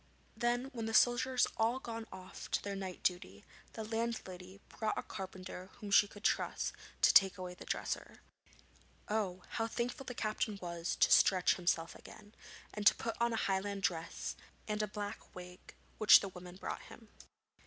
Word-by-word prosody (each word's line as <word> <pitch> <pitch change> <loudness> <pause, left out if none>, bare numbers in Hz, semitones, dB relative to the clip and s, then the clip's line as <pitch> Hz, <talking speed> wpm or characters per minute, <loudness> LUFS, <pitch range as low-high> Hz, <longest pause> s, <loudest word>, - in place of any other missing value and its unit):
Then, 245 +2 0
when 225 -3 -3
the 225 - -1
soldiers 250 +1 +4
had - - -8
all 230 +3 +2
gone 230 -3 -6
off 185 0 -9
to - - 0
their 200 -1 -3
night 190 -2 -6
duty, 100 - -1 0.3
the 220 - -5
landlady 210 -5 -4
brought 220 -1 -2
a - - -2
carpenter 185 -1 -7
whom 205 -1 -8
she 205 0 +7
could 205 +1 -13
trust - - 0 0.3
to - - +7
take 195 -1 +6
away 180 -1 -5
the - - -11
dresser. - - -4 0.9
Oh! 195 -4 -1
how 225 -1 -2
thankful 245 +3 -3
the 250 - -5
captain 215 -1 -1
was 170 -1 -3
to - - +4
stretch 185 -2 +6
himself 170 -2 0
again, 210 0 -14 0.4
and 210 -1 +2
to - - +8
put 230 - -3
on 235 0 +3
a - - 0
Highland 195 0 -1
dress 165 -2 -2 0.3
and 210 0 -1
a 210 - 0
black 205 0 -6
wig 180 0 -11 0.2
which 215 - +9
the 195 - -4
woman 180 -1 -10
brought 190 - -5
him. 225 -2 -14
205 Hz, 175 wpm, -35 LUFS, 185-225 Hz, 0.9 s, which